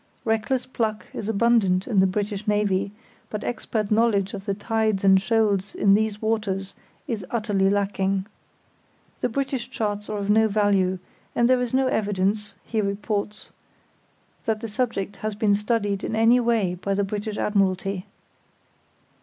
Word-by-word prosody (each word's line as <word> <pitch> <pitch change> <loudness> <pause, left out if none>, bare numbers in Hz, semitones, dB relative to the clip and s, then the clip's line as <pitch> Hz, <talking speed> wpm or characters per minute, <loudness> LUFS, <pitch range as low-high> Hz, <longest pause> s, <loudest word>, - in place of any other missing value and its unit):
Reckless 225 +3 0
pluck 220 -4 -2
is 215 - -4
abundant 205 -4 +3
in 215 -5 +2
the 190 - +5
British 205 +2 -3
Navy, 205 -2 +1 0.4
but 210 0 -4
expert 220 -3 -2
knowledge 210 -3 +2
of 195 -1 -6
the 200 -2 -1
tides 215 -1 0
and 190 -1 +6
shoals 205 -2 +1
in 200 -1 +4
these 215 0 +1
waters 210 -3 -1 0.3
is 220 -5 -3
utterly 205 -4 +1
lacking. 195 -1 0 0.9
The - - 0
British 265 +1 -2
charts 210 -1 -3
are 210 - -2
of 200 -1 -3
no 220 +1 +4
value, 200 -3 +2 0.4
and 235 - +4
there 255 0 +3
is 245 0 -1
no 265 0 +3
evidence 210 -2 0
(he 220 -2 -1
reports) 205 +1 -3 0.9
that 220 -1 0
the 230 - -4
subject 205 -4 -2
has 215 -1 -3
been 205 -1 +2
studied 205 -1 0
in - - -2
any 225 +3 +5
way 230 -6 +1
by 195 +2 -2
the 200 - +1
British 210 +2 -4
Admiralty. 195 -2 0
210 Hz, 155 wpm, -24 LUFS, 195-225 Hz, 0.9 s, and